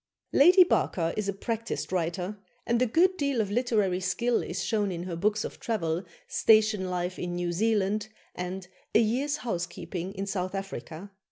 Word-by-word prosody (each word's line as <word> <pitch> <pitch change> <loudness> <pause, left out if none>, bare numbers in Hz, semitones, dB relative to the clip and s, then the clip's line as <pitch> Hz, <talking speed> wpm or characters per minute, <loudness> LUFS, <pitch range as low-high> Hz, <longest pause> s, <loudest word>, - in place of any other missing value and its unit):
" - - -47
Lady 360 +4 +8
Barker 170 - +1
is 210 -2 -1
a - - 0
practised 230 +2 -3
writer, 180 +3 -2 0.3
and 235 +1 +1
a 255 - +4
good 365 +10 +3
deal 280 -5 0
of 205 -2 0
literary 210 -6 +1
skill 235 +6 +1
is - - -4
shown 210 -3 0
in 175 -1 -4
her 180 -2 -4
books 210 +5 +1
of - - -7
travel, 175 -6 -1 0.2
"Station 215 -3 +3
Life 180 0 -2
in 175 0 -3
New 175 0 -1
Zealand" 210 +1 +1 0.3
and 180 +1 -5 0.3
"A - - +8
Year's 260 +7 +1
Housekeeping 180 -2 -4
in 195 +1 -3
South 185 -1 -3
Africa." 195 -1 -6
200 Hz, 175 wpm, -28 LUFS, 180-225 Hz, 0.3 s, Lady